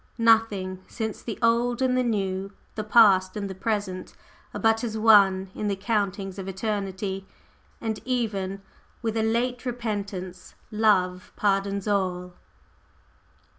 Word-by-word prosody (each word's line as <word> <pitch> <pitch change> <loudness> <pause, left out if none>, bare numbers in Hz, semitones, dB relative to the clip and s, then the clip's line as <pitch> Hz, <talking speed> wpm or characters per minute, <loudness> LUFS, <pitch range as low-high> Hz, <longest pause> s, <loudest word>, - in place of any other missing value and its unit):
Nothing 215 -5 +2
since 220 -2 -4
the 225 - -5
Old 235 +1 +2
and 260 -1 +2
the 255 - +3
New, 195 -4 -1 0.2
the 215 - -4
Past 205 -4 +5
and 200 -1 -3
the 190 - -5
Present, 190 -2 -3 0.4
are - - -5
but 225 0 +2
as 220 -2 -2
one 210 -3 +7
moment 190 0 -7
in 210 - -2
the 200 - 0
countings 195 -2 -2
of 190 - -6
eternity, 195 -1 -3 0.5
and 220 -2 -3
even 200 -6 -2 0.4
with 225 -1 -1
a 225 - +1
late 240 +3 0
repentance 200 -7 -5 0.2
Love 185 -4 +2
pardons 200 0 0
all. 180 -3 -1
205 Hz, 135 wpm, -26 LUFS, 190-225 Hz, 0.5 s, one